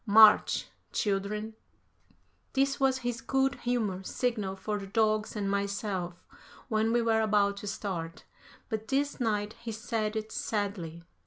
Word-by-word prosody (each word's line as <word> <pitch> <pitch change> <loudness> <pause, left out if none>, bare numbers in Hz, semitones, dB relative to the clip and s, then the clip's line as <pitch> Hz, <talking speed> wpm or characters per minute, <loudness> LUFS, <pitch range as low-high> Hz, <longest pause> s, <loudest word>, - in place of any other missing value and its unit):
March! 215 +1 +7 0.3
Children!" 210 +2 -1 1.0
This 275 +1 +2
was 265 -1 +3
his 240 -1 -1
good 270 +3 +2
humor 220 -6 0
signal 210 -2 -1
for 205 +2 -3
the 195 - -7
dogs 215 +1 +1
and 205 -2 -1
myself 200 -3 -2 0.4
when 220 0 +2
we 240 0 +3
were 225 -1 +3
about 205 -2 +3
to 205 - -6
start, 180 -5 -4 0.4
but 220 -1 -3
this 280 +3 0
night 210 -3 0
he 235 -1 -4
said 220 -1 -2
it 220 0 -3
sadly. 190 -6 -3
215 Hz, 140 wpm, -30 LUFS, 200-230 Hz, 1.0 s, March